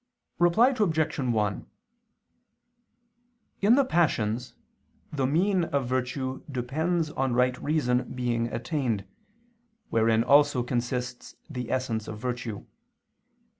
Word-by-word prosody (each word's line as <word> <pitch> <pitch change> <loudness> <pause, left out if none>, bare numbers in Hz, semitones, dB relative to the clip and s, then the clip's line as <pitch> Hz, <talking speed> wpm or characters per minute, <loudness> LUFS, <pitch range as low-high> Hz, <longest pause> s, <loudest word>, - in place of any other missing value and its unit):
Reply 175 +9 +5
Obj. 165 - 0
1: 110 -6 -1 1.9
In 210 +4 +6
the 275 0 +4
passions, 125 - 0 0.6
the 135 -3 0
mean 180 +5 +2
of 140 -4 -1
virtue 130 +1 -2
depends 155 +6 -1
on 130 -4 -1
right 125 0 +3
reason 130 -5 0
being 120 -2 -1
attained, 120 -4 -2 0.9
wherein 115 0 +3
also 140 -1 +4
consists 125 0 -3
the 125 -2 -5
essence 120 -4 -2
of 105 - -6
virtue. 120 -2 -4
130 Hz, 100 wpm, -27 LUFS, 120-155 Hz, 1.9 s, In